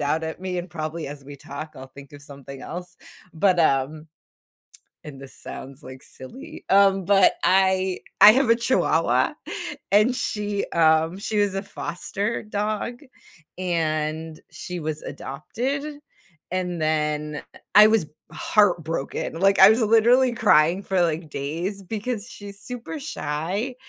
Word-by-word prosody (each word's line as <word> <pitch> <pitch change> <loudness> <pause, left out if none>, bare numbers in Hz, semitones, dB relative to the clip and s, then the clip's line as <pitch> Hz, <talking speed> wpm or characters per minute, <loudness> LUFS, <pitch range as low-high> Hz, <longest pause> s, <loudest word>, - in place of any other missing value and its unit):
out 155 +3 0
at 160 +2 -6
me, 185 -1 -3
and 175 - -5
probably 160 -1 -5
as 140 -1 -9
we 145 0 -10
talk, 140 +3 -9
I'll 130 - -9
think 140 0 -13
of 145 - -12
something 140 -1 -11
else, 180 +1 -8 0.4
but, 180 +1 +2
um 150 +1 +1 1.0
and 135 -3 -10
this 135 - -12
sounds, 135 +2 -10
like, 130 0 -11
silly, 130 - -12
um, 195 -1 +4
but 195 -1 +5
I 190 0 +2 0.2
I 210 - +11
have 260 0 +2
a 230 - +6
chihuahua, 240 +2 +1 0.6
and 215 +5 +4
she, 205 -4 -2
um, 160 +2 +3
she 210 +1 -3
was 205 -2 +2
a 195 - -1
foster 200 +3 -4
dog, 215 +4 -3 0.6
and 160 -3 -2
she 180 -1 -7
was 155 -1 -4
adopted, 240 - -4 0.7
and 180 -3 -2
then, 150 -1 -1 0.2
eh, - - -14 0.2
I 210 +1 +10
was 220 -8 +2 0.2
heartbroken, 165 -5 0
like, 195 +1 +3
I 190 +2 +10
was 220 - +3
literally 235 +3 +4
crying 180 -5 +3
for, 190 -1 0
like, 160 -1 -2
days 170 +9 -4
because 220 +2 -4
she's 200 -3 -11
super 250 +7 -7
shy, 200 - -3
180 Hz, 145 wpm, -23 LUFS, 155-205 Hz, 1.0 s, I